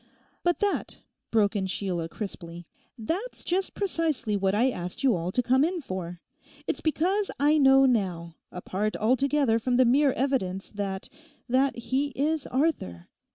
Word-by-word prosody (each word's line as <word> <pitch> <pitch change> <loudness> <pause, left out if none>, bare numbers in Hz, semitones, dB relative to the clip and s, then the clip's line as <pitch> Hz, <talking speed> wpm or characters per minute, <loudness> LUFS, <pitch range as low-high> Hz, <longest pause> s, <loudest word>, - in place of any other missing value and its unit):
'But 350 -1 +1
that,' 410 -1 -1 0.3
broke 215 -1 +2
in 190 -2 -1
Sheila 180 -3 -2
crisply—'that's 210 - -7
just 375 +2 -1
precisely 320 - -1
what 195 0 +1
I 250 +5 +3
asked 180 0 -6
you 255 -6 +4
all 170 +1 -3
to 250 - +1
come 260 +3 +3
in 350 +3 0
for. 180 - -6 0.4
It's - - -2
because 370 +6 +1
I 300 +2 +4
know 270 -1 +6
now, 180 -9 0 0.2
apart 195 +4 -3
altogether 260 +1 +2
from 245 +2 0
the 255 +1 +5
mere 275 +4 +4
evidence, 195 -9 -1
that—that 255 +7 -2
he 260 +4 -1
is 300 +1 0
Arthur. 245 - -1
250 Hz, 145 wpm, -27 LUFS, 190-290 Hz, 0.4 s, know